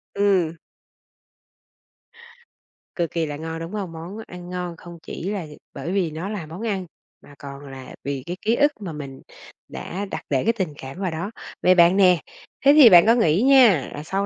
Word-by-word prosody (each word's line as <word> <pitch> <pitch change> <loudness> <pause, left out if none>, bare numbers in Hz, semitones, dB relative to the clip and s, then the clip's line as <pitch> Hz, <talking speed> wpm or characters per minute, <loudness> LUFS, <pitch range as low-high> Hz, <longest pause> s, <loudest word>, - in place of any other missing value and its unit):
Ừm. 185 -5 +1 2.4
Cực 170 -2 -2
kỳ 165 -1 -1
là 145 -1 -5
ngon, 160 +1 -6
đúng 165 +3 -7
hông? 195 -5 -4
Món 170 +6 -8
ăn 180 0 -10
ngon 180 -2 -5
không 170 0 -11
chỉ 185 - -6
là 195 -6 -3 0.3
bởi 175 - -5
vì 185 -5 0
nó 165 +6 -5
là 200 -7 -5
món 165 +6 -9
ăn, 190 -3 -2 0.4
mà 145 - -16
còn 140 -1 -9
là 130 -1 -10
vì 140 -2 -4
cái 175 +2 -5
ký 225 +2 +1
ức 290 +2 +3
mà 175 -5 -5
mình 140 -3 -8 0.5
đã 195 +3 -6
đặt - - -4
để 135 -3 +1
cái 230 - +2
tình 185 -9 -3
cảm 135 +6 -9
vào 190 -3 -2
đó. 170 +7 -4 0.3
Vậy 185 0 +5
bạn 175 +2 +5
nè, 180 -3 +5 0.5
thế 280 - +8
thì 290 -6 +9
bạn 175 -2 +8
có 230 - +6
nghĩ 185 -5 +2
nha, 245 - +5
là 145 - -7
sau 195 +4 -2
175 Hz, 200 wpm, -23 LUFS, 160-200 Hz, 2.4 s, thì